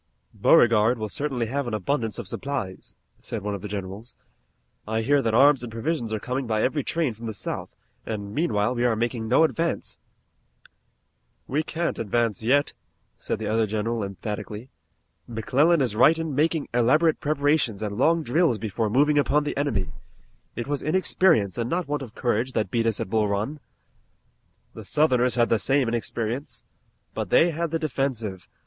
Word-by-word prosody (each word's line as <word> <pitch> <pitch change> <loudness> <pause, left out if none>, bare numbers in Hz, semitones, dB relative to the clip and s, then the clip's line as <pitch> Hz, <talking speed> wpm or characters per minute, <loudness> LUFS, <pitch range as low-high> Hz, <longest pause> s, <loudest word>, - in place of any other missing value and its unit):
"Beauregard 115 +1 +4
will 110 -1 -4
certainly 135 -1 -2
have 135 +3 -2
an 115 - -2
abundance 115 +2 -1
of 120 -6 -6
supplies," 100 -7 -5 0.2
said 110 -4 -6
one 105 0 -2
of 100 - -5
the 105 - -5
generals. 100 +3 -7 0.7
"I 110 +1 -1
hear 145 +4 +3
that 115 -3 0
arms 140 +2 +6
and 120 -2 -6
provisions 115 0 -2
are 110 - -1
coming 130 +3 -3
by 110 -1 0
every 145 +2 0
train 160 -5 -1
from 115 +2 -8
the 110 - -4
South, - - -5 0.3
and 100 -2 -5
meanwhile 120 -7 +1
we 120 -1 -1
are 120 -2 +3
making 115 0 -2
no 130 +8 +4
advance." 165 +1 -1 1.5
"We 145 +4 0
can't 165 +2 -3
advance 115 0 0
yet," 140 +6 +2 0.4
said - - -3
the 110 - -5
other 110 +1 +1
general 110 +2 -2
emphatically. 105 +5 -6 0.6
"McClellan 140 +8 +2
is 120 -5 0
right 155 +8 +5
in 165 -2 -3
making 155 +2 +1
elaborate 150 +7 +3
preparations 145 -7 +1
and 105 -1 -3
long 160 +7 +2
drills 155 -2 +2
before 110 +1 -2
moving 145 +6 +3
upon 145 +1 +2
the 145 - -3
enemy. 140 -10 -1 0.6
It 120 - -3
was 145 0 -2
inexperience, 155 - +2
and 115 0 -1
not 175 -1 -1
want 145 0 -2
of 125 -4 -9
courage, 120 +1 -1
that 105 -4 -1
beat 115 -1 +1
us 110 -3 0
at 95 - -4
Bull 110 -2 +2
Run." 105 +9 -2 1.1
"The 110 - -9
Southerners 125 0 +2
had 120 -1 +2
the 115 - +3
same 135 +1 +2
inexperience." 115 +2 -3 0.5
"But - - -4
they 170 - +5
had 165 +1 -2
the 165 - 0
defensive. 125 - -3
120 Hz, 175 wpm, -25 LUFS, 110-145 Hz, 1.5 s, arms